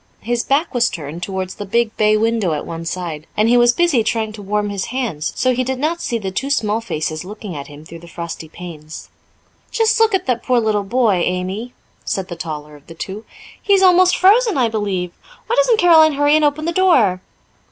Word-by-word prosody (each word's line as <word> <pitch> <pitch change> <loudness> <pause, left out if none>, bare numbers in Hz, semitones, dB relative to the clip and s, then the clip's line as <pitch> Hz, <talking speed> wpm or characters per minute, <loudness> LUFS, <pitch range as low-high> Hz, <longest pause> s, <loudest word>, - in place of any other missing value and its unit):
His 235 +2 -1
back 285 +7 0
was 240 -1 +2
turned 160 +1 -7
towards 190 0 -4
the - - -7
big 230 +2 0
bay 215 0 +3
window 220 -5 0
at 150 - -4
one 165 0 -6
side, 165 -3 -5
and 215 +1 +3
he 240 - +4
was 240 0 +5
busy 295 -4 +2
trying 220 -1 -1
to 210 - -9
warm 205 +1 -2
his 195 -2 -3
hands, 230 - -3
so 255 0 +1
he 255 +1 0
did 260 +1 -3
not 320 +5 -1
see 235 - -2
the 195 -4 -5
two 265 +9 -3
small 225 -5 0
faces 155 -6 -4
looking 205 -1 -8
at 140 -1 -7
him 145 +1 -13
through 165 +1 -11
the 170 - -14
frosty 170 -1 -7
panes. 155 -3 -10 0.6
"Just 450 0 +1
look 445 -2 +4
at 380 - -2
that 245 -3 0
poor 250 0 +2
little 215 -2 0
boy, 225 -2 +1
Amy," 190 +7 -3 0.3
said 190 -1 -3
the 175 - -5
taller 150 -2 -7
of 145 - -19
the 165 - -11
two. 200 +6 -7 0.4
"He 405 - +2
is 385 -1 +4
almost 365 0 +5
frozen, 425 - +4
I 245 -3 +2
believe. 200 -5 -2 0.3
Why 475 - -1
doesn't - - +3
Caroline 320 -5 +6
hurry 290 +1 +3
and 310 - +3
open 295 +1 +1
the 340 - 0
door?" 270 - +3
220 Hz, 220 wpm, -18 LUFS, 180-275 Hz, 0.6 s, Caroline